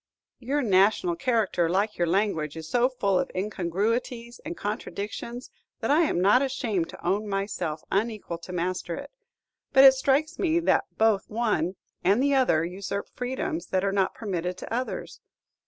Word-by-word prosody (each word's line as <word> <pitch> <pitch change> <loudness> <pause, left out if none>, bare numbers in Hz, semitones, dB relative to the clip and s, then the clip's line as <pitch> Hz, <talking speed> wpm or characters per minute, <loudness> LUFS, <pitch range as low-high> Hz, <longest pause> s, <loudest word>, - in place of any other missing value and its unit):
"Your 275 +4 -1
national 215 - +3
character, 225 - +1
like 200 +4 0
your 175 - +2
language, 165 -5 0
is 160 -1 -7
so 245 +6 +2
full 200 -7 +1
of - - -1
incongruities 215 +6 -2
and 330 +3 -6
contradictions 215 +3 -5 0.3
that - - 0
I 300 - +5
am 230 - 0
not 205 +8 +5
ashamed 230 -10 -1
to - - -11
own 200 +4 0
myself 195 -6 -3
unequal 205 -4 -1
to 175 - -10
master 180 -1 -2
it; - - -8 0.6
but 270 -1 +8
it 270 -1 +10
strikes 280 +5 +1
me 335 -2 +2
that - - +2
both 220 -3 +2
one 210 -6 0 0.3
and 200 +5 +4
the 285 0 +3
other 245 -12 +3
usurp 195 +3 -5
freedoms 260 +6 -3
that 185 0 0
are 195 - +1
not 195 -1 +1
permitted 180 -4 -3
to - - -7
others. 250 +2 -4
210 Hz, 165 wpm, -26 LUFS, 185-250 Hz, 0.6 s, it